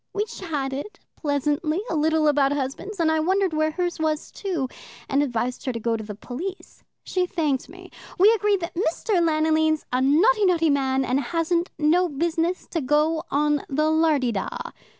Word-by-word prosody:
We 415 +1 0
chatted 295 -5 -5 0.2
pleasantly 295 +2 -1
a 335 - -2
little 315 0 +2
about 285 -1 +3
husbands, 290 +9 -4
and 320 -1 +3
I 315 - +2
wondered 375 +2 +1
where 310 0 +1
hers 350 +1 -2
was 310 -1 -1
too, 350 -10 -3 0.4
and 275 +1 +2
advised 250 -2 -2
her 260 - 0
to 230 - -4
go 230 +1 0
to 220 - -5
the 210 -1 -7
police. 325 - -7 0.2
She 365 -1 -1
thanked 300 -8 -1
me. 365 +2 -13 0.3
We 405 +4 +6
agreed 415 -3 +1
that 335 - -5
Mr. 355 +2 0
Lanoline's 315 -1 +2
a 255 - +2
notty, 395 - +4
notty 330 -4 +3
man, 265 -1 +1
and 255 +2 +1
hasn't 335 +5 0
no 335 +4 +3
business 335 +4 -1
to 330 - -1
go 300 +4 +2
on 295 0 +1
the 305 +3 +1
lardy 310 -6 +2
da. 195 -4 -2
315 Hz, 175 wpm, -24 LUFS, 280-350 Hz, 0.4 s, We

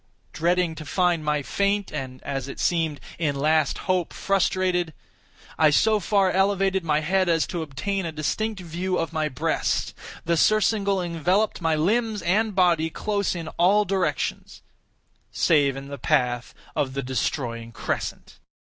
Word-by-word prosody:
Dreading 175 0 +1
to 160 - -8
find 170 +2 +1
my 150 -1 0
faint, 200 +5 0
and, 130 -1 -6
as 135 -2 -3
it 140 - -8
seemed, 165 -4 0 0.2
my 160 -3 +1
last 150 +1 +1
hope 185 -3 0
frustrated, 185 -3 0 0.6
I 155 - +6
so 215 +8 +3
far 195 0 +2
elevated 195 -1 +2
my 155 -2 +1
head 185 +3 +1
as 165 -1 +3
to 175 - -4
obtain 190 +7 -3
a - - -4
distinct 195 +7 -2
view 180 +2 -2
of 165 0 -2
my 155 -1 0
breast. 130 - -1 0.3
The 170 0 +1
surcingle 200 -1 +2
enveloped 180 +5 0
my 165 -1 +2
limbs 210 +5 0
and 210 +3 +1
body 170 -4 +3
close 200 +2 -1
in 165 -2 -5
all 200 +4 +4
directions—save 165 -5 -2
in 135 0 -8
the 140 - -7
path 120 -1 0 0.2
of 135 -2 -1
the 140 - -2
destroying 120 -2 -3
crescent. - - -4
170 Hz, 150 wpm, -24 LUFS, 150-195 Hz, 0.6 s, I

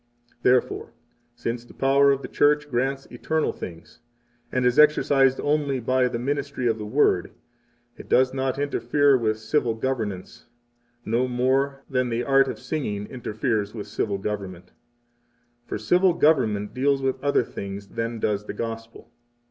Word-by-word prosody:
10 - - -35
Therefore, 125 -2 +1 0.4
since 115 0 -4
the 120 - -17
power 140 +1 +4
of 135 0 -1
the - - -4
Church 150 0 +2
grants 135 +3 -1
eternal 160 -1 -1
things, 85 -2 -10 0.5
and 125 -1 0
is 125 +4 +3
exercised 140 -3 +4
only 145 -2 0
by 130 +2 +2
the 120 -1 -3
ministry 140 +1 -3
of 115 -1 0
the 105 - -5
Word, - - +2 0.7
it - - -12
does 130 +1 +3
not 130 0 -1
interfere 140 0 +2
with 110 -3 0
civil 115 +1 0
government; 110 -7 -4 0.6
no 120 +3 +1
more 135 +3 0
than 125 -2 0
the 120 +1 -1
art 135 0 +4
of - - -4
singing 105 -10 -3
interferes 110 -3 -2
with 105 - -5
civil 100 -2 -2
government. 95 -3 -5
11 - - -35 0.9
For - - -3
civil 180 - +3
government 110 -11 +2
deals 135 +1 +1
with 135 0 -1
other 140 -3 +2
things 100 -2 -7
than 115 0 -3
does 105 -1 -1
the - - -4
Gospel. 115 +1 -7
125 Hz, 155 wpm, -24 LUFS, 110-140 Hz, 0.9 s, power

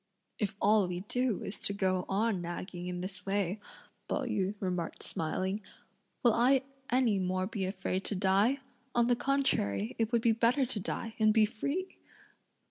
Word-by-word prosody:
"If 200 -1 -1
all 205 -2 +4
we 180 0 -3
do 245 +1 0
is 195 - -3
to 200 - +1
go 185 -2 0
on 205 -1 +1
nagging 175 +1 -5
in 180 0 -4
this 185 0 -5
way," 195 0 -1 0.5
Pao - - -1
yü 210 -5 -1
remarked 180 -3 -3
smiling, 190 +5 -2 0.6
"will 240 -3 +6
I 255 +3 +4 0.3
any 240 -5 +3
more 185 0 0
be 195 -1 -3
afraid 185 0 -2
to 205 - 0
die? 200 +8 +3 0.3
on 240 -1 +4
the 245 0 +3
contrary, 115 - +1
it 225 0 +1
would 235 -2 +2
be 230 - +5
better 240 +4 +3
to 240 -4 -1
die, 220 +3 -3
and 215 0 +5
be 215 0 +5
free!" 280 - -3
205 Hz, 170 wpm, -31 LUFS, 185-235 Hz, 0.6 s, will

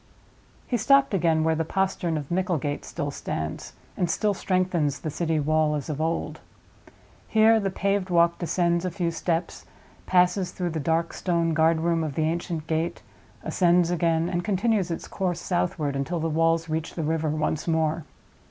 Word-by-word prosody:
He 245 - 0
stopped 275 +2 +4
again 165 -4 +2
where 160 0 +2
the 160 +1 0
postern 180 -1 -1
of 145 0 -6
Micklegate 170 -6 -1
still - - -4
stands, 80 +1 -5 0.2
and 175 - 0
still 205 +5 +1
strengthens 180 -7 0
the 155 - -3
city 160 0 0
wall 155 +1 +2
as 150 +1 -4
of 150 +1 -4
old. 165 +1 -2 0.9
Here 220 0 +5
the 200 -2 -1
paved 195 0 -1
walk 170 -1 +3
descends 170 0 +1
a 185 - -1
few 175 -1 -2
steps, 165 +1 -2 0.4
passes 180 +1 +2
through 180 -2 -2
the 160 - -3
dark 165 +3 0
stone 170 -2 0
guardroom 165 +1 +2
of 150 -3 -4
the 160 - +1
ancient 165 -1 -2
gate, 160 +1 -2 0.4
ascends 175 -1 +3
again, 165 -1 +1
and 175 -1 -2
continues 205 -1 +1
its 165 - -4
course 180 -3 -2
southward 165 -5 -1
until 150 +6 -2
the 160 - -1
walls 165 +1 +2
reach 160 0 -3
the 165 - -2
river 160 0 0
once 155 +1 -1
more. 160 -1 +1
165 Hz, 170 wpm, -25 LUFS, 160-180 Hz, 0.9 s, Here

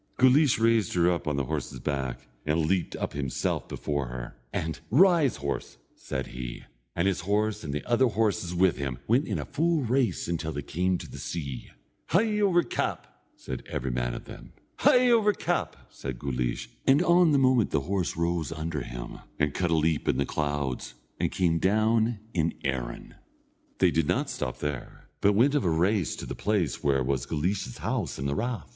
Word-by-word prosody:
Guleesh 130 +1 +5
raised 115 -5 +2
her 90 0 +4
up 85 -2 -2
on 75 - +1
the 70 - 0
horse's 65 0 -4
back, 65 -2 -3 0.2
and 75 +1 +1
leaped 90 +1 0
up - - -3
himself 70 -3 -2
before 70 -3 -2
her, - - -7 0.2
and, 80 -2 -3
"Rise, 165 - +5
horse," 70 -3 -4 0.2
said 65 -1 -4
he; 60 -1 -7 0.3
and 85 +3 +1
his 95 - +1
horse, 105 +3 0
and 75 - -4
the 75 - -3
other 125 +2 +3
horses 105 -6 0
with 90 0 +3
him, 70 -3 -3
went 125 +7 +3
in - - -1
a - - -3
full 165 -1 +1
race 125 +1 +1
until 80 -2 -2
they 70 - -4
came 90 +5 0
to - - -9
the - - -9
sea. 70 -7 -5 0.4
"Hie 210 +3 +2
over 185 -4 +4
cap!" - - -3 0.2
said 65 - -6
every 65 +1 -2
man - - -1
of - - -8
them. - - -11 0.2
"Hie 250 -1 +5
over 215 -3 +4
cap!" - - -1 0.2
said 65 -3 -6
Guleesh; 60 -2 -2 0.2
and 140 +5 +5
on 175 -1 +5
the 145 - +4
moment 130 -4 +4
the - - +1
horse 90 +1 -2
rose 85 -2 0
under 80 -2 -3
him, - - -7 0.2
and 75 0 +1
cut 90 +1 0
a 85 - +3
leap 80 -1 +1
in - - +2
the 70 - +1
clouds, 70 -4 -2 0.2
and - - 0
came 85 -3 +1
down 110 +4 +2 0.2
in 85 -2 0
Erin. 65 -4 -3 0.6
They - - +4
did 80 -2 +1
not - - 0
stop 65 - -3
there, 75 -3 -5
but 100 - +4
went 125 +8 +4
of 145 - +2
a 90 - +2
race 90 +3 +1
to - - -7
the - - -5
place - - -1
where 70 -2 +2
was 65 -2 -1
Guleesh's 80 -3 -2
house - - -2
and 70 - -2
the 70 - 0
rath. 115 - -2
85 Hz, 195 wpm, -28 LUFS, 70-115 Hz, 0.6 s, Guleesh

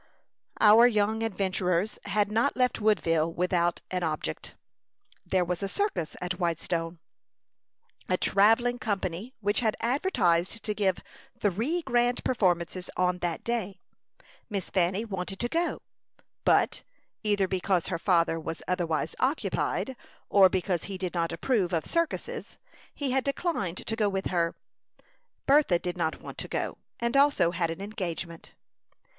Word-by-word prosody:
Our 220 +3 +8
young 220 -1 +1
adventurers 190 -2 0
had 205 0 +1
not 230 +6 +1
left 250 -3 +1
Woodville 165 -7 +2
without 175 0 0
an 180 -1 -1
object. 155 - -3 0.7
There 185 -2 +2
was 180 +1 -2
a 195 - -2
circus 400 - -2
at 180 +1 -4
Whitestone 170 0 -1 1.1
a 185 - +2
travelling 225 +6 +3
company 205 +2 -3
which 205 +1 +1
had 220 -3 +1
advertised 230 - +1
to 210 - -1
give 195 -3 0 0.3
three 230 - 0
grand 245 -2 +1
performances 180 -5 0
on 180 0 +1
that 175 -2 -2
day. 205 -5 -2 0.7
Miss 200 -4 -4
Fanny 190 +4 +1
wanted 195 -2 -4
to 240 - 0
go; 335 +6 -1 0.6
but, - - +3 0.4
either 205 -3 +1
because 185 -1 0
her 170 -3 -2
father 170 -3 +2
was 165 0 -6
otherwise 175 -4 -1
occupied, 265 -1 0 0.3
or 195 -2 +7
because 185 -1 -1
he 195 -1 -5
did 185 -2 -3
not 170 -2 0
approve 200 -9 0
of 165 - 0
circuses, 335 -1 -2 0.4
he 280 -3 -2
had 265 0 +2
declined 275 - -2
to 225 - -2
go 215 -2 +2
with 195 -1 -2
her. 170 -2 +1 0.9
Bertha 275 -10 +5
did 175 +1 -4
not 165 -3 -2
want - - -8
to - - -4
go, - - -3 0.2
and 235 +1 -1
also 280 -11 +4
had 170 -1 -1
an 165 +3 -5
engagement. 175 -5 -5
195 Hz, 140 wpm, -28 LUFS, 175-225 Hz, 1.1 s, Our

